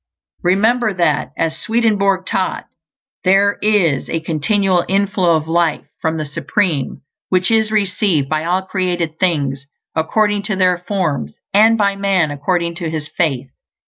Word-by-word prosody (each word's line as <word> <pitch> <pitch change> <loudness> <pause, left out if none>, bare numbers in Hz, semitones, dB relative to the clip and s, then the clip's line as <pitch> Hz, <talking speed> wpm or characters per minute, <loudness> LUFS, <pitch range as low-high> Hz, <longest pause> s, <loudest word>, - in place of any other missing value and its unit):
Remember 215 +4 +2
that, 170 -4 +1
as 160 -1 -1
Swedenborg 200 -4 +1
taught, 190 -1 -2 0.6
there 195 +2 +3
is 195 -10 +1
a 165 - -1
continual 175 +3 +1
inflow 195 -3 +2
of 155 0 -2
life 165 -1 0 0.2
from 160 0 -1
the 155 - -3
Supreme, 145 -1 -2 0.3
which 185 +3 +2
is 220 -1 +2
received 195 -7 +1
by 155 +2 -1
all 180 +3 0
created 175 -4 -2
things 140 -6 0 0.3
according 205 +6 +1
to 195 - 0
their 180 -2 +2
forms; 160 - -2 0.2
and 220 +3 +5
by 200 -2 +1
man 195 -6 +1
according 170 +4 -1
to 170 -3 -3
his 155 -2 -4
faith. 135 -6 -1
180 Hz, 145 wpm, -17 LUFS, 160-200 Hz, 0.6 s, and